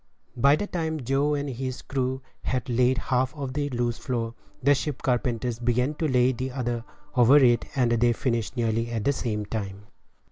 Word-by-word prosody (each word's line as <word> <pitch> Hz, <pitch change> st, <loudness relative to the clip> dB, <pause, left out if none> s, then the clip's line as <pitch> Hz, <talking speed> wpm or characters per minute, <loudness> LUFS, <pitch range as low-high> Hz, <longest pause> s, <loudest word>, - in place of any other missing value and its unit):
By 140 Hz, +4 st, +5 dB
the 205 Hz, -, -2 dB
time 160 Hz, -5 st, -2 dB
Joe 140 Hz, +4 st, +1 dB
and 145 Hz, 0 st, -2 dB
his 130 Hz, 0 st, -4 dB
crew 130 Hz, -1 st, -2 dB, 0.2 s
had 125 Hz, -2 st, -2 dB
laid 125 Hz, +1 st, +2 dB
half 130 Hz, +2 st, 0 dB
of 135 Hz, -3 st, -4 dB
the 145 Hz, 0 st, -1 dB
loose 120 Hz, -2 st, -1 dB
floor, 115 Hz, -3 st, -2 dB, 0.3 s
the 140 Hz, +2 st, +6 dB
ship 140 Hz, 0 st, -3 dB
carpenters 120 Hz, -2 st, 0 dB
began 125 Hz, +3 st, +1 dB
to 155 Hz, +1 st, -1 dB
lay 125 Hz, -2 st, +3 dB
the 130 Hz, +1 st, -4 dB
other 120 Hz, -3 st, -2 dB, 0.3 s
one 120 Hz, -2 st, +4 dB
over 140 Hz, +4 st, +8 dB
it, 120 Hz, -4 st, +4 dB
and 125 Hz, -3 st, +2 dB
they 120 Hz, +1 st, +3 dB
finished 115 Hz, 0 st, -1 dB
nearly 115 Hz, 0 st, 0 dB
at 115 Hz, -3 st, -2 dB
the 140 Hz, -, +2 dB
same 105 Hz, -5 st, -2 dB
time. 100 Hz, -2 st, -5 dB
125 Hz, 190 wpm, -26 LUFS, 120-135 Hz, 0.3 s, over